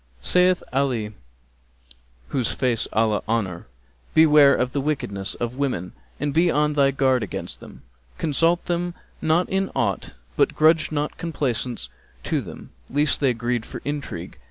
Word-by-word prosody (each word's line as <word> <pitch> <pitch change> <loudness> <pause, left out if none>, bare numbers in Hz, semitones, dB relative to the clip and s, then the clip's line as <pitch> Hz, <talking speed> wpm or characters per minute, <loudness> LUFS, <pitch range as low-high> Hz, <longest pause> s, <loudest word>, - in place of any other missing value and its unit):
Saith 180 - +3
Ali 125 -6 0 1.2
(whose 125 -4 0
face 125 -4 0
Allah 110 -1 +2
honour!), 100 -7 -2 0.5
'Beware 150 -3 +7
of 125 0 0
the 140 - -1
wickedness 105 -9 -2
of 120 +1 -4
women 125 -11 -2 0.3
and 145 0 -1
be 170 +3 +4
on 150 -1 +2
thy 140 -2 +4
guard 130 -2 +2
against 105 - -5
them: - - -13 0.3
consult 165 +3 +1
them 175 0 -2 0.3
not 165 +3 +2
in 195 0 0
aught;[FN#264] 100 -5 -1 0.2
but - - +2
grudge 155 0 +4
not 150 -1 -2
complaisance 125 - -2 0.4
to - - 0
them, - - -10 0.2
lest 145 +1 +2
they 130 -4 +2
greed 120 0 -1
for - - -8
intrigue.' 140 - -5
140 Hz, 145 wpm, -23 LUFS, 115-155 Hz, 1.2 s, Beware